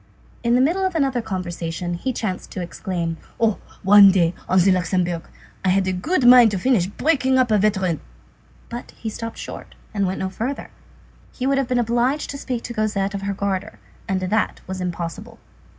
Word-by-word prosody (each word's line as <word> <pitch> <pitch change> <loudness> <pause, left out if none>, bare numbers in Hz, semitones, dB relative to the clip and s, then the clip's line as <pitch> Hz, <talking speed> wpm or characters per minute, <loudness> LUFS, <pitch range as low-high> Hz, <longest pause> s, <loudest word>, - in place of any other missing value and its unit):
In 235 0 +2
the 250 - +4
middle 340 +8 +2
of 375 -2 -1
another 270 -5 +1
conversation, 175 -3 -4
he 215 +10 -2
chanced 210 -6 -4
to - - -5
exclaim:— 170 -2 -3 0.2
"Oh! 220 -3 +2 0.2
One 200 0 +8
day, 175 -3 +3 0.2
at 185 0 +5
the 190 +2 +4
Luxembourg, 180 -2 0 0.4
I 190 - +2
had 190 +1 +3
a 185 - +1
good 260 - 0
mind 245 -2 +9
to 205 - -2
finish 210 -4 +2
breaking 265 +3 +1
up 255 -3 +3
a 210 - +4
veteran!" 190 -6 +1 0.7
But 240 +1 -8
he 220 - -5
stopped 230 +1 -6
short, - - -8 0.2
and 200 -2 +1
went 185 - -2
no 190 0 -2
further. 250 +8 -4 0.6
He 255 - -5
would 275 0 +2
have 270 - -1
been 250 - 0
obliged 240 +5 +1
to 280 - -7
speak 250 -4 -4
to 240 - -5
Cosette 210 -3 -1
of 200 - -4
her 200 0 -2
garter, 200 +1 -3 0.3
and 190 -1 0
that 210 +4 0
was 185 0 -5
impossible. 180 +6 -5
205 Hz, 195 wpm, -22 LUFS, 185-245 Hz, 0.7 s, mind